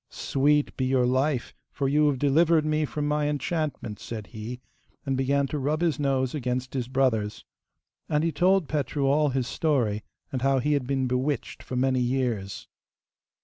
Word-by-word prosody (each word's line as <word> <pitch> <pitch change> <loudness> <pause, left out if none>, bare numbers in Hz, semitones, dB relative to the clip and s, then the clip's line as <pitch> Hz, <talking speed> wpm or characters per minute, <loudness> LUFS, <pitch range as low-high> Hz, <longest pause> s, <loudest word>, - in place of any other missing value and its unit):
'Sweet 145 +2 +1
be 130 - 0
your 130 -1 +2
life, 130 +1 0 0.2
for 140 - -1
you 150 +2 +3
have 140 -2 +1
delivered 155 +3 +3
me 155 0 +1
from 150 0 -3
my 150 0 +1
enchantment,' 145 -7 -3
said 110 -3 -6
he, 115 +3 -7 0.5
and 135 -1 0
began 140 +2 +1
to 145 +2 -3
rub 150 +4 0
his 165 -3 +1
nose 135 -3 +1
against 130 -2 -2
his 125 -3 -2
brother's. 125 -5 0 0.6
And 150 0 +1
he 165 - +1
told 185 +1 +3
Petru 145 -1 -1
all 145 +2 +3
his 130 -1 -1
story, 120 -7 0 0.3
and 130 - -2
how 135 0 +3
he 145 +4 +1
had 140 -4 0
been 135 -1 0
bewitched 130 +2 -2
for 130 - -6
many 130 0 +2
years. 120 -6 -1
135 Hz, 175 wpm, -26 LUFS, 125-150 Hz, 0.6 s, you